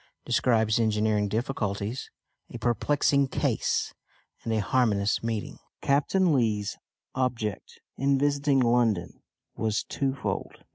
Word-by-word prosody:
DESCRIBES 110 -2 +2
ENGINEERING 105 -2 +1
DIFFICULTIES, 110 0 -3 0.4
A - - -6
PERPLEXING 140 +3 +2
CASE, - - 0 0.5
AND 115 - -3
A 110 - +1
HARMONIOUS 105 -2 +1
MEETING. 115 -2 -4 0.2
Captain 155 +5 +2
Lee's 110 -6 0 0.4
object 120 -6 -3 0.2
in 135 +1 +3
visiting 140 0 +2
London 115 -7 +1 0.3
was 110 -1 -1
twofold. 135 -1 -3
115 Hz, 100 wpm, -27 LUFS, 105-135 Hz, 0.5 s, in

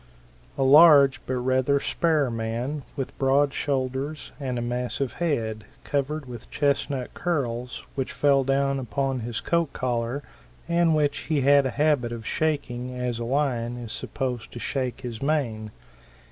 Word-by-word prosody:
A 135 - +2
large 140 -1 +7
but 130 - -1
rather 130 +2 +2
spare 155 -4 +1
man, 115 +6 -3
with 135 - -4
broad 140 +1 +3
shoulders 135 +2 -2
and 130 -3 -3
a - - -2
massive 125 +2 -2
head, 115 -10 -1 0.2
covered 145 +1 -2
with 120 -3 -9
chestnut 140 -2 -1
curls 125 -8 -2
which 135 -2 -3
fell 140 -2 +3
down 135 +1 +1
upon 135 +1 -1
his 115 -1 -4
coat 170 -4 0
collar 125 +2 -2 0.4
and 170 -1 +3
which 145 -2 +1
he 150 -3 +2
had 140 0 +5
a 130 - -6
habit 145 -6 +2
of 115 -2 -6
shaking 125 -5 -2
as 125 -2 -2
a 120 - -3
lion 120 -3 0
is 120 -3 -7
supposed 125 -4 -4
to - - -7
shake 130 0 -3
his 120 -3 -6
mane. 130 -8 -1
135 Hz, 150 wpm, -25 LUFS, 120-145 Hz, 0.4 s, large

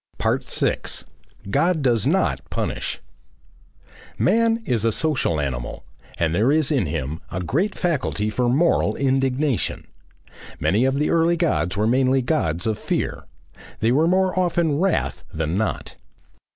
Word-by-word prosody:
6. - - -1 0.5
GOD 165 - +2
DOES 120 -5 +2
NOT - - +1
PUNISH - - -3 1.2
Man 225 - +2
is 115 - 0
a 115 - +3
social 130 - 0
animal, 65 -2 -4 0.3
and 80 -1 0
there 110 +9 +3
is 155 -1 +2
in 130 - +1
him 75 +2 -3
a 95 - -4
great 165 - 0
faculty 130 - -1
for 120 +2 0
moral 160 +7 +2
indignation. 135 0 0 0.7
Many 110 +6 +2
of 135 0 +1
the 150 +2 0
early 170 +1 +3
Gods 155 - 0
were 105 - +2
mainly 130 +2 +2
Gods 90 - 0
of 110 -2 -1
Fear. - - -3 0.5
They 115 - +2
were 155 +6 +3
more 185 +1 +2
often 170 -4 +1
"wrath" 190 -1 0
than 80 +1 -2
not. 110 +3 -2
130 Hz, 140 wpm, -22 LUFS, 105-160 Hz, 1.2 s, a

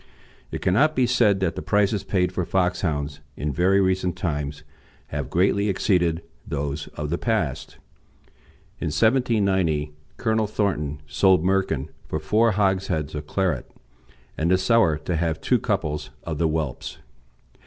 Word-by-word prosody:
It - - -5
cannot 145 +12 +3
be 130 - +3
said 115 -6 +3
that 90 -3 +1
the - - -4
prices 105 -1 +1
paid 90 -2 0
for 90 -1 -1
Foxhounds 85 -6 -1 0.2
in 75 0 -2
very 95 +5 +3
recent 95 -2 +1
times 75 -3 -3 0.5
have 70 -2 -4
greatly 100 +5 +2
exceeded 85 -4 +1 0.2
those 70 0 -3
of 75 0 -4
the 85 - -1
past. 105 - -2 1.0
In - - -2
1790 95 - +2 0.3
Colonel 110 -1 +1
Thornton 75 -9 -2
sold 90 +4 +3
Merkin 95 -7 0 0.2
for - - -2
four 105 +9 +2
hogsheads 95 -6 0
of 75 -1 -5
claret, 90 -10 -1 0.7
and 80 +2 +1
the 95 - +5
seller 95 -5 +3
to 90 - -1
have 80 -1 -1
two - - +2
couples 75 0 -2
of 80 -3 -4
the 85 - +3
whelps. 80 -4 -3
90 Hz, 145 wpm, -24 LUFS, 75-100 Hz, 1.0 s, the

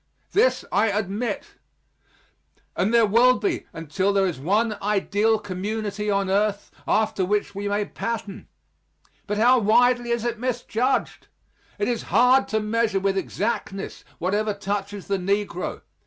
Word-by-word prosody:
This 470 +5 +2
I 210 +3 +3
admit. 205 +2 -3 1.2
And 195 - +1
there 235 -1 +5
will 240 +5 +5
be 385 -4 -2
until 165 +5 -1
there 195 -1 +3
is 175 -8 -2
one 210 +8 +1
ideal 210 +2 +1
community 210 +1 -4
on 200 -1 +1
earth 200 +1 0 0.2
after 215 -3 +1
which 205 +2 0
we 200 +1 -4
may 205 0 0
pattern. 215 -2 -5 0.8
But 210 0 -2
how 245 +4 +5
widely 240 +3 +3
is 235 -1 -1
it 235 -2 -2
misjudged! 245 0 -1 0.5
It 205 - -1
is 240 -2 -1
hard 250 +6 +4
to 220 - 0
measure 215 -1 0
with 195 0 0
exactness 195 0 -3
whatever 205 +4 0
touches 200 0 -4
the 195 -1 -1
negro. 195 -1 -2
210 Hz, 140 wpm, -24 LUFS, 200-230 Hz, 1.2 s, there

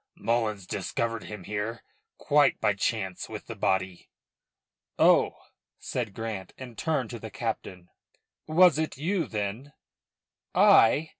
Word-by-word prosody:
"Mullins 110 -4 -1
discovered 115 +4 -3
him 105 -3 -8
here 105 +4 -4 0.3
quite 145 -3 +3
by 105 - +2
chance 95 -2 -2
with - - -7
the - - -7
body." 95 -1 -1 0.9
"Oh!" - - +4 0.4
said 100 - -4
Grant, 110 -5 -5
and 125 -3 -9
turned 140 -4 -1
to 120 - -6
the 110 - -7
captain. 100 -4 -5 0.6
"Was 160 0 +5
it 160 -3 -2
you 170 +4 -1
then 110 +7 -4 0.5
" - - -53
"I?" 145 +8 +6
115 Hz, 130 wpm, -27 LUFS, 100-140 Hz, 0.9 s, I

